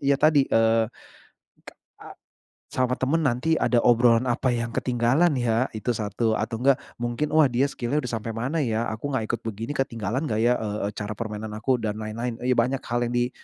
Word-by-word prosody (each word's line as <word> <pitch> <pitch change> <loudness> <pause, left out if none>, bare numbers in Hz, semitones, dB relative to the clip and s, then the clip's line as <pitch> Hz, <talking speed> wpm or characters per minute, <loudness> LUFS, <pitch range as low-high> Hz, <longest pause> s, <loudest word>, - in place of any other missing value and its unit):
ya 140 0 +4
tadi, 150 -3 +5
eee, 115 -1 +3 0.8
ke - - -11 0.3
a - - -10 0.6
sama 125 -1 +1
teman 150 +5 +1
nanti 140 +4 +1
ada 120 - +2
obrolan, 120 0 +4
apa 125 +1 +1
yang 115 0 -2
ketinggalan 130 +7 +2
ya 120 +1 +1
itu, 110 +3 -2
satu 110 +1 -1
atau 115 - -3
enggak 135 0 +5 0.2
mungkin, 120 +5 -2
wah 155 -2 +6
dia 125 +3 +2
skill-nya 140 +5 -2
udah 125 -1 -5
sampai 115 +1 -5
mana 125 +8 -2
ya, 115 -2 -1
aku 110 +6 -4
nggak 115 -4 0
ikut 115 - -1
begini 115 +2 -5
ketinggalan 120 +2 -2
nggak 110 -6 -1
ya, 120 - +4
eee 105 -1 -3
eee, - - -15
cara 105 0 -4
permainan 110 -1 -5
aku 125 +4 0
dan 105 -1 -1
lain-lain, 115 +3 -4
iya 125 0 +2
banyak 130 +3 +1
hal 120 0 -1
yang 120 - -4
di 120 +1 +1
120 Hz, 200 wpm, -25 LUFS, 115-130 Hz, 0.8 s, wah